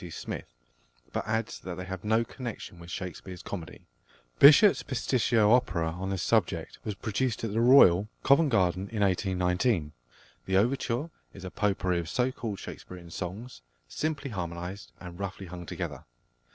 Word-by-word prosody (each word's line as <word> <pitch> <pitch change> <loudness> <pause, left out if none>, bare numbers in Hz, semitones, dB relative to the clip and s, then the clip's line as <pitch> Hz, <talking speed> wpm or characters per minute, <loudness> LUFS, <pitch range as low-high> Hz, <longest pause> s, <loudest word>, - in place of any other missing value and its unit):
C. 90 - -8
Smith, 80 - -6 0.6
but - - -2
adds 110 0 -2
that 90 -2 -6
they 90 - -5
have 95 -1 -6
no 110 +2 +2
connection 115 -8 -7
with 85 0 -11
Shakespeare's 90 0 -7
comedy. 90 -5 -7 0.5
+Bishop's+ 155 +8 +8
pasticcio 115 -4 +2
opera 85 -10 +2
on 95 +3 -5
this 95 -3 -2
subject - - 0
was 105 - -4
produced 110 +4 -2
at 110 -3 -2
the 115 - +1
Royal, 105 -6 +6
Covent 140 +3 +5
Garden, 95 -4 +1
in 110 -2 -3
1819. 90 -2 +1 0.6
The 95 0 +2
overture 125 +6 0 0.2
is 95 -1 -9
a 90 - -6
potpourri 95 -3 0
of 85 -1 -5
so 125 +7 +1
called 110 -5 -5
Shakespearian 90 -3 -10
songs, 95 - -6 0.3
simply 150 -3 -3
harmonised 90 +1 -5
and 90 -1 -10
roughly 100 0 -5
hung 90 -1 -9
together. - - -5
95 Hz, 155 wpm, -28 LUFS, 90-115 Hz, 0.6 s, +Bishop's+